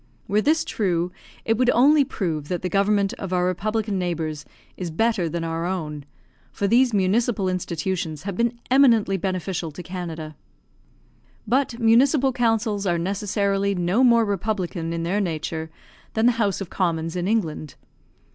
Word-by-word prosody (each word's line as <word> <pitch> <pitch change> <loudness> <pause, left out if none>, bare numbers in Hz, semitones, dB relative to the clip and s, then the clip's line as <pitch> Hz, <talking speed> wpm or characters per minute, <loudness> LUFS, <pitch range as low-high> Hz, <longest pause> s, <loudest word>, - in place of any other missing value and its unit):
Were 205 +2 +2
this 315 +6 +2
true, 180 -4 -1 0.3
it 225 0 +1
would 250 -1 +3
only 285 +5 +5
prove 165 - -3
that 180 +1 -3
the 180 - -1
government 200 +1 +2
of 195 -2 -5
our 180 -1 +1
republican 210 +2 -1
neighbours 160 -4 -3 0.3
is 180 -2 -4
better 195 0 +1
than 170 +1 -3
our 165 +1 -2
own; 150 -6 -4 0.5
for 200 - -2
these 245 +5 +4
municipal 210 +1 +1
institutions 170 -3 -3
have 200 -2 -4
been 235 +2 0
eminently 235 -7 +5
beneficial 185 -2 -2
to 155 +4 -9
Canada. 165 -3 -6 1.1
But 245 +1 0
municipal 260 +4 +4
councils 225 -4 0
are 175 -1 +2
necessarily 200 +2 0
no 180 +7 +2
more 235 -2 +5
republican 190 -4 -2
in 165 0 -3
their 190 +5 0
nature, 160 -2 -3 0.5
than 220 +1 +2
the 245 - +6
House 200 -2 0
of 190 - -6
Commons 165 -3 -1
in 180 0 -1
England. 165 -9 -1
195 Hz, 155 wpm, -23 LUFS, 170-225 Hz, 1.1 s, the